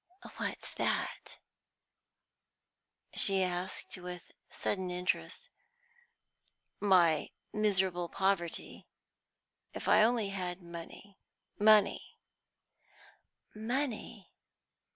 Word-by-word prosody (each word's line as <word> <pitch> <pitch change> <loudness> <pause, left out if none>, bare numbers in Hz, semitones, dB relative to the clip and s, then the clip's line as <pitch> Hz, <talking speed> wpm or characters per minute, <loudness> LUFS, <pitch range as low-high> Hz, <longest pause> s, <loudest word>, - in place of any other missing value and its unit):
"What's - - -4
that?" - - -2 1.8
she 195 -1 +4
asked, 180 +1 -3
with 180 0 -8 0.2
sudden 190 -2 -2
interest. 180 +1 -2 1.3
"My 175 -6 +4 0.2
miserable 190 -5 +1
poverty. 190 -3 -1 0.9
If - - -5
I - - +6
only 225 -2 +3
had 180 -2 -4
money 170 +3 -10 0.4
money" 210 -1 +4 1.4
"Money!" 230 -3 -3
190 Hz, 70 wpm, -33 LUFS, 180-210 Hz, 1.8 s, I